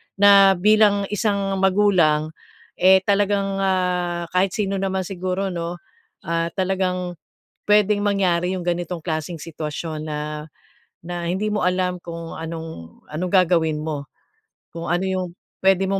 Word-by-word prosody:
na 195 -1 +7
bilang 205 +1 +4
isang 200 -2 0
magulang, 185 -6 +3 0.5
eh, 190 +1 +6
talagang, 200 0 +1
ah, 180 -3 0
kahit 185 0 +1
sino 195 -2 -1
naman 190 -1 -1
siguro 185 +1 -3
'no, 170 0 -4 0.5
ah, 165 0 -1
talagang 185 -2 -1 0.4
puwedeng 210 0 +3
mangyari 185 -3 +1
'yung 175 - -7
ganitong 175 0 -2
klaseng 160 0 -4
sitwasyon 155 0 -5
na 150 -1 -4 0.9
na 175 -1 -4
hindi 195 +4 -1
mo 210 - 0
alam 180 0 0
kung 170 -1 -7
anong 160 - -7
anong 170 +4 -3
gagawin 165 -5 +3
mo, 150 -3 -5 0.6
kung 165 0 -6
ano 175 +2 0
'yung 190 -1 -1 0.3
puwede 190 0 +3
mong 195 0 +1
180 Hz, 130 wpm, -22 LUFS, 170-195 Hz, 0.9 s, na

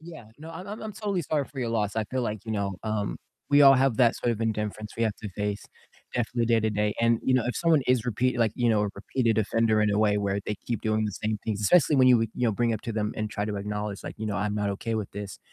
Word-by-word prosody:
Yeah, 160 -7 -11
no, 160 +2 -9
I'm 180 +4 -8
I'm 210 +2 -7
I'm 220 -1 -5
totally 200 -4 -2
sorry 150 -1 -1
for 135 - -12
your 120 -2 -1
loss, 110 -2 -1
I 110 - +1
feel 130 +4 -3
like, 110 -3 -4
you 110 - -4
know, 100 -3 -2
um, 110 -2 -2 0.3
we 145 0 +6
all 135 -1 +9
have 135 -3 +2
that 120 -2 +4
sort 120 - 0
of 110 - -6
indifference 105 -1 -3
we 115 - -1
have 110 -3 +1
to 105 - -7
face 105 -1 -2 0.5
definitely 120 0 0
day 115 -1 +3
to 110 0 0
day, 105 0 0
and, 115 0 +3
you 130 - +2
know, 125 -3 +2
if 125 - -2
someone 165 -4 +3
is 125 -3 +2
repeat 125 +2 0
like, 115 -3 +2
you 120 -1 +1
know, 110 -2 +3
a - - -1
repeated 115 +2 0
offender 110 0 +2
in 105 0 +2
a 100 - +1
way 105 -1 +3
where 100 0 -1
they 105 - -2
keep 120 -2 -2
doing 110 0 +1
the 105 - -2
same 105 +2 -2
things, 105 -2 -2
especially 150 - +4
when 130 -1 +5
you 125 -2 +6
you 125 - 0
know, 110 - +1
bring 120 +2 +1
up 110 - -3
to 115 - -4
them, 105 -1 -1
and 105 -1 -3
try 105 - -2
to 105 -1 -3
acknowledge, 105 0 -4
like, - - -6
"You 110 - -3
know, 100 -3 -2
I'm 105 +1 -1
not 105 -1 -1
okay 115 +3 -3
with 110 -3 -3
this," 100 -1 -7
110 Hz, 290 wpm, -27 LUFS, 105-125 Hz, 0.5 s, all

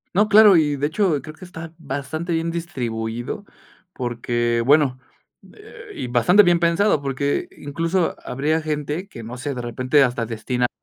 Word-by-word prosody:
No, 210 +2 +3
claro, 210 -2 +8
y 150 -3 +2
de 145 +2 0
hecho 165 -4 0
creo 155 +2 -10
que 185 - -15
está 165 -2 -9
bastante 155 +3 -5
bien 165 0 0
distribuido 120 - -4 0.5
porque, 120 -3 -1
bueno, 140 -2 +4 0.6
eh, - - -13
y 125 - -5
bastante 125 - +5
bien 175 -3 +4
pensado 170 0 +2
porque 140 +1 -2
incluso 165 +5 -1
habría 150 +5 -1
gente 155 +4 -3
que 115 - -10
no 115 +3 -7
sé 135 +3 -4
de 125 - -5
repente 130 +4 +1
hasta 120 -2 0
destinaba 120 +2 -2
145 Hz, 160 wpm, -22 LUFS, 125-165 Hz, 0.6 s, claro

